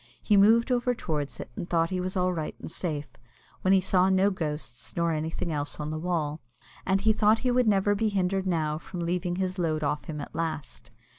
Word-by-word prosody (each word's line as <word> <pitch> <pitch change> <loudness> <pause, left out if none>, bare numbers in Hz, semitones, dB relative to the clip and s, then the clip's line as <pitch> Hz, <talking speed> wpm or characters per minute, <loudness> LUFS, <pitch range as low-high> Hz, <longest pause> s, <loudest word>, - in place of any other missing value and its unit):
He 210 - +2
moved 225 +5 +5
over 245 0 +1
towards 150 -8 -3
it, - - -7
and 175 - -5
thought 165 0 +2
he 185 - -1
was 185 +2 -3
all 180 0 +2
right 160 -3 -4
and - - -8
safe, 155 -4 -3 0.6
when 185 - +2
he 195 - +6
saw 185 0 +3
no 190 +1 +4
ghosts 150 -8 -5
nor 170 -1 +1
anything 160 +2 -2
else 145 -1 -3
on 150 0 -3
the 155 - -3
wall, 160 -3 -2 0.5
and 195 0 +2
he 220 +1 +4
thought 215 +1 +4
he 250 - +3
would 250 -1 +3
never 205 0 +3
be 215 +2 +1
hindered 190 -1 0
now 155 -3 0
from 175 +1 -7
leaving 175 +1 -1
his 185 0 -2
load 155 -3 0
off 150 +1 -1
him 150 -2 -5
at 145 - -7
last. 160 -6 -4
180 Hz, 220 wpm, -27 LUFS, 155-195 Hz, 0.6 s, he